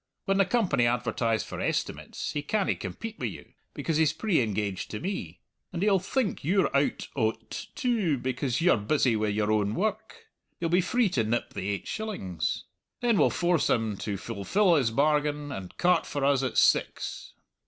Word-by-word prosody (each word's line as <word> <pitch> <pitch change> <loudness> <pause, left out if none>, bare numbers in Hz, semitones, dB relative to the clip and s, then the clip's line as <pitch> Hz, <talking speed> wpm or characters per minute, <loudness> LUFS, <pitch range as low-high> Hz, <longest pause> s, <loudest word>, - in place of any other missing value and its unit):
When 195 0 +1
the 195 - +5
Company 195 - +2
advertise 115 -2 0
for - - -6
estimates - - -2
he 145 - -2
canna 195 +6 0
compete 225 0 -7
wi' - - -1
you, - - -9 0.2
because 160 -2 -1
he's 155 -2 +3
pre 200 -10 +1
engaged 105 -3 -2
to 105 - -4
me; 195 +2 -5 0.3
and 180 +1 -2
he'll 200 -2 +4
think 205 +3 -1
you're 185 -1 +2
out 140 +1 +1
o't 110 -4 -2
too, 215 - +1
because 130 +2 -1
you're 175 -6 +5
busy 115 +3 +2
wi' 110 0 0
your 105 +1 0
own 105 -1 +1
woark. 220 - -3 0.3
You'll 165 -1 -1
be 180 +2 +4
free 240 +3 +2
to 125 -10 +1
nip 115 +2 -1
the 95 +1 -3
eight 100 -1 -3
shillings. 140 - -3 0.4
Then 235 -4 +3
we'll - - +5
force 175 -2 +1
him 110 -3 +1
to 100 0 -3
fulfill 115 - +1
his 135 -8 +3
bargain 145 +2 +1
and 95 -8 -7
cart 180 0 +3
for 145 -1 -1
us 140 -2 +3
at 130 - -2
six." - - +1
145 Hz, 180 wpm, -28 LUFS, -, 0.4 s, the